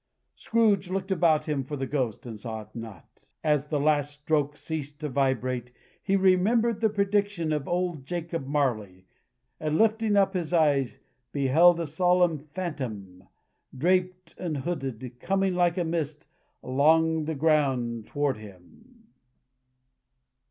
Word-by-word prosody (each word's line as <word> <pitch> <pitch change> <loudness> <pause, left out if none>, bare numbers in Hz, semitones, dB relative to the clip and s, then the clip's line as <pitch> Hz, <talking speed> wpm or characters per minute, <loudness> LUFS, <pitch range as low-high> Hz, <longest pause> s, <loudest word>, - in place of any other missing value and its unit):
Scrooge 210 -5 +1
looked 190 +1 -3
about 165 -4 +2
him 145 -3 -1
for 145 +3 -6
the 135 - -2
Ghost, 130 -6 -2
and 115 -3 -7
saw 110 0 -5
it 105 - -23
not. 110 -7 -11 0.2
As 150 -2 +1
the 150 -1 -1
last 145 -1 +2
stroke 150 -1 0
ceased 145 -2 -6
to 150 - -2
vibrate, 130 -2 -1 0.3
he 195 - +1
remembered 205 +4 +3
the 220 - +4
prediction 200 -5 0
of 150 -2 -2
old 175 -5 -1
Jacob 165 -2 -4
Marley, 110 -11 -1 0.5
and 155 0 -1
lifting 220 -1 +2
up 195 -1 +3
his 175 -3 -3
eyes, 145 -6 +2 0.3
beheld 160 +6 +4
a 170 - -1
solemn 175 +1 +2
Phantom, 130 - -6 0.5
draped 185 +4 0
and 165 -5 -3
hooded, 130 -6 -5
coming 195 -1 0
like 175 -1 +2
a 180 - +1
mist 160 -3 -3 0.4
along 160 +4 +3
the 160 0 -2
ground 135 -7 +1
toward 145 -4 -1
him. 110 - -16
155 Hz, 140 wpm, -27 LUFS, 135-180 Hz, 0.5 s, the